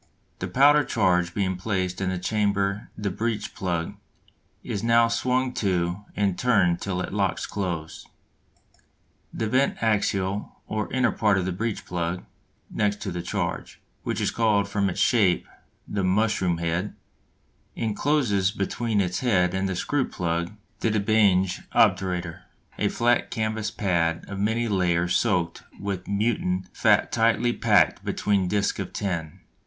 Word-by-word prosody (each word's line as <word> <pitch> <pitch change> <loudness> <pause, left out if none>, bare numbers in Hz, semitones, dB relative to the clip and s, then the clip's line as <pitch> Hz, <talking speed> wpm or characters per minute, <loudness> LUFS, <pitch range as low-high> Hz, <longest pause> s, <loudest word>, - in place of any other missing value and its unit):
The - - -3
powder 145 +3 +5
charge 90 -7 +1
being 95 -3 0
placed 95 -2 -2
in 95 - 0
the 95 - -2
chamber 100 +1 0
the 105 -2 -2
breech 110 +1 -3
plug 85 -3 -2 0.7
is 100 - -3
now 115 +1 +4
swung 125 +2 0
to 90 0 -1
and 100 -3 0
turned 100 -9 +3
till 95 -2 -2
it 90 - -5
locks 100 -3 0
close. 85 -6 -4 1.2
The 110 - -2
vent 130 +5 +2
axial 100 -2 0
or 110 0 -3
inner 130 -2 +2
part 105 -3 +2
of 95 - 0
this 95 - -2
breech 110 +3 -3
plug 85 0 -3 0.5
(next 105 -1 0
to 100 - -3
the 90 0 -3
charge), 90 - -4 0.2
which - - -3
is - - 0
called 105 -3 +2
from 100 -1 0
its 90 - -4
shape 100 -8 +3 0.4
the 100 -1 -2
"mushroom 95 -2 +1
head," 85 +4 -2 0.8
encloses 110 -3 +1
between 105 +1 -1
its 90 -1 -1
head 90 -8 +2
and 95 0 -1
the 95 - -2
screw 135 +8 -1
plug 85 0 -2 0.3
the 115 - +1
de 110 0 +1
Bange 100 -3 +3
obturator, 90 -2 +2 0.4
a 105 - +2
flat 120 +3 +1
canvas 110 -2 -2
pad 85 -5 0
of 100 -1 -6
many 110 +3 0
layers 90 -3 +1
soaked 90 -7 0 0.2
with 100 -2 -4
mutton 100 -3 0
fat - - +3
tightly 115 +1 +2
packed 105 -5 +3
between 100 -3 0
discs 100 +1 0
of 100 - -5
tin. 85 -6 -3
100 Hz, 150 wpm, -25 LUFS, 90-110 Hz, 1.2 s, powder